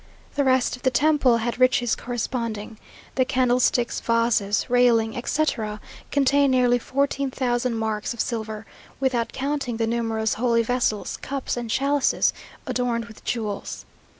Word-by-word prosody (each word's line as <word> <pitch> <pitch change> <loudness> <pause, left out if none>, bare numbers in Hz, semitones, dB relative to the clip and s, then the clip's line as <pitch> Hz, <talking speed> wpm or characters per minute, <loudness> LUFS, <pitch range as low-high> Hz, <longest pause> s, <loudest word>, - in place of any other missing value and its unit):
The 285 - +1
rest 260 -2 +2
of 250 - -16
the 260 - +3
temple 270 -2 +3
had 235 +2 -3
riches 255 -2 +3
corresponding. 230 -3 -4 0.3
The 260 - +2
candlesticks, 250 -1 +1
vases, 230 -3 +1
railing, 240 -3 +3
etc., 235 -5 -1 0.3
contain 280 0 +3
nearly 250 -1 +3
fourteen 275 +2 -1
thousand 245 -2 -1
marks 220 -1 -2
of 235 - -7
silver, 220 -2 -3 0.3
without 255 -3 0
counting 270 -3 -2
the 225 - +1
numerous 225 -1 0
holy 230 0 +2
vessels, 240 -3 -1
cups 275 -1 -3
and 240 -2 -5
chalices 275 +4 +2 0.3
adorned 240 -2 -1
with 230 -2 -14
jewels. 215 -4 -4
240 Hz, 135 wpm, -24 LUFS, 225-260 Hz, 0.3 s, the